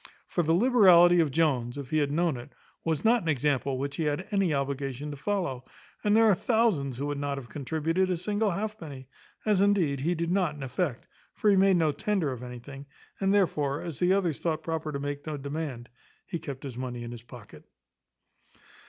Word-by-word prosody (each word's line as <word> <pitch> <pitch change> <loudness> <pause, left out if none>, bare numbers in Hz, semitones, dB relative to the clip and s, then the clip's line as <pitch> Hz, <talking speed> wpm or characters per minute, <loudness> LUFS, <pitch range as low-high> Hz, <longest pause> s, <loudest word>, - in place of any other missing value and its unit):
For 175 - -1
the 165 0 +2
liberality 180 -6 +6
of 160 -3 +3
Jones, 135 -5 0
if 140 -3 -7
he 155 - +2
had 145 -1 +1
known 165 0 +1
it, 120 +3 -10 0.3
was 160 +1 -1
not 235 +1 +5
an 165 - -3
example 140 -2 0
which 140 +1 -3
he 160 - 0
had 150 +5 -1
any 195 -4 +2
obligation 140 0 -2
to - - -5
follow; 150 -6 -2 0.4
and 210 +1 +4
there 225 - +6
are 215 - +6
thousands 185 - +1
who 140 - -3
would 145 -1 -3
not 140 -1 -2
have 125 -4 -8
contributed 160 +7 -1
a 180 - 0
single 210 +4 0
halfpenny, 170 -9 -5 0.4
as 210 -3 +3
indeed 185 -9 +2
he 170 +6 0
did 170 +1 -2
not 180 -5 +1
in 145 - -7
effect, 135 0 -2 0.3
for 210 - +3
he - - +5
made 190 -1 +5
no 160 -3 +2
tender 180 -2 -1
of 125 -2 -6
anything; 125 +3 -9 0.3
and 195 0 +2
therefore, 150 -8 +1
as 165 -6 -6
the 180 +1 +3
others 185 -6 +1
thought 160 -2 -2
proper 160 -2 -3
to 140 - -3
make 145 +1 -5
no 155 -1 -3
demand, 140 -4 -5 0.4
he 170 -3 -4
kept 140 -3 -7
his 130 -3 -6
money 125 -2 -4
in 120 - -6
his 120 -1 -8
pocket. 120 - -13
155 Hz, 205 wpm, -28 LUFS, 140-185 Hz, 0.4 s, liberality